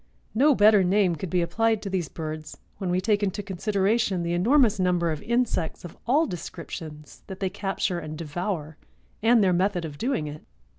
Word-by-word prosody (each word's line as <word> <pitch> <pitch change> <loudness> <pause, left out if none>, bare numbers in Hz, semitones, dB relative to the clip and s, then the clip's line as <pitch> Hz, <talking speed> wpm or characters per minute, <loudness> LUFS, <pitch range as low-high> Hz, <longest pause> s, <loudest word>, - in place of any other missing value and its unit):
No 280 +5 +4
better 210 -2 +6
name 185 -1 +2
could 170 +3 -5
be 180 0 +1
applied 225 +4 +1
to 200 - -4
these 180 -5 -1
birds 155 -1 -6 0.2
when 190 - -2
we 180 +1 +1
take 205 +2 +1
into 205 +1 -1
consideration 195 0 0
the 170 0 -1
enormous 220 +3 +3
number 180 -2 +1
of 155 - -4
insects, 235 -10 -1
of 175 - -9
all 295 +7 +4
descriptions, 160 - -8
that 190 -1 -8
they 190 -2 -1
capture 195 -2 -2
and 155 -1 -7
devour 160 -1 -4 0.4
and 225 0 +5
their 185 -2 +3
method 180 -1 +1
of 145 -2 -8
doing 245 - -1
it. 150 +1 -8
185 Hz, 185 wpm, -26 LUFS, 170-210 Hz, 0.4 s, better